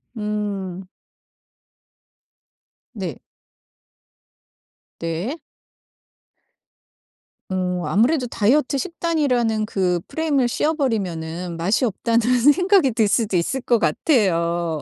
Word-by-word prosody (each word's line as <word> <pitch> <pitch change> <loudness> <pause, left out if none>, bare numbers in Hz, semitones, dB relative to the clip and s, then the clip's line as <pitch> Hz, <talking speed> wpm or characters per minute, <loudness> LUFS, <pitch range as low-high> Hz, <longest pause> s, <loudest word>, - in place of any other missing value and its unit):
음. 200 -4 -4 2.1
네. 185 - -5 1.8
네. 165 - -3 2.1
음 180 -1 -1
아무래도 250 +6 +2
다이어트 260 +6 +1
식단이라는 270 - 0
그 180 -4 0
프레임을 290 -6 0
씌워버리면은 180 - -2
맛이 190 +10 +1
없다는 230 +1 0 0.2
생각이 360 - +4
들 220 -2 +2
수도 205 -3 +1
있을 260 +10 -1
것 240 -2 +2
같아요. 170 - +1
215 Hz, 180 characters per minute, -21 LUFS, 180-265 Hz, 2.1 s, 생각이